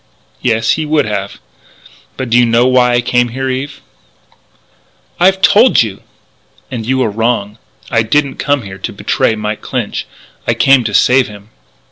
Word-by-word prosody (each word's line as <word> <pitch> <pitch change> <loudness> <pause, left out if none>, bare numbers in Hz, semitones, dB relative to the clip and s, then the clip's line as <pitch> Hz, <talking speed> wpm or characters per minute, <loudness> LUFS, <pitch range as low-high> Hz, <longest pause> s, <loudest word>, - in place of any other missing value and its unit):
"Yes, 115 -2 +1
he 160 - 0
would 150 0 +1
have. 100 -2 -4 0.8
But 130 -3 -5
do 120 - +4
you - - +5
know 115 +1 +3
why 125 -1 +3
I 120 - +2
came 120 0 +1
here, 130 +3 -4
Eve?" 140 +2 -5 1.4
"I've 190 +2 +3
told 215 - +5
you!" 100 -4 -7 0.7
"And 115 -3 -5
you 130 0 +1
are 110 - -1
wrong. 110 -1 -2 0.3
I 115 - +3
didn't 140 +5 0
come 145 -3 0
here 95 -1 -9
to - - -5
betray 110 - 0
Mike 105 0 -4
Clinch: - - -4 0.4
I 115 - +1
came 135 +2 +4
to 105 -2 -2
save 130 0 +4
him." 105 +1 -13
120 Hz, 165 wpm, -14 LUFS, 110-130 Hz, 1.4 s, you